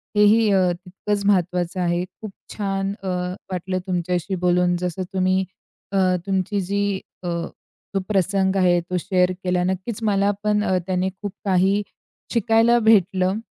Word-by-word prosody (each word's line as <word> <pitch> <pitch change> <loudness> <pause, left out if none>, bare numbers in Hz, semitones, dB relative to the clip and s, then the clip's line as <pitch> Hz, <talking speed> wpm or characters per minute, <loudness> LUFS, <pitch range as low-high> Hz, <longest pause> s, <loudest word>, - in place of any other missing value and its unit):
हेही 210 +1 +5
अ, 185 -2 +3
तितकंच 195 +3 -4
महत्त्वाचं 180 -2 +1
आहे. 175 0 +1
खूप 210 +2 -10 0.2
छान 195 -1 -2
अ, - - -4 0.4
वाटलं 185 +1 -2
तुमच्याशी 180 +1 -1
बोलून. 180 0 +3
जसं 180 +1 -3
तुम्ही 185 0 +2 0.5
अ, 195 - 0 0.3
तुमची 195 +1 0
जी 200 +2 -1 0.4
अ, - - -4 0.7
तो 195 - +1
प्रसंग 195 0 +1
आहे, 175 -2 +4
तो 180 +1 -3
शेअर 180 0 +1
केला. 180 -1 +1
नक्कीच 190 +5 -3
मला 200 -1 +2
पण 210 0 +2
अ, 190 -3 +1
त्याने 185 0 0
खूप 205 -2 -4
काही 195 +2 +3 0.5
शिकायला 230 +1 +4
भेटलं 195 -3 +3
190 Hz, 140 wpm, -22 LUFS, 180-205 Hz, 0.7 s, हेही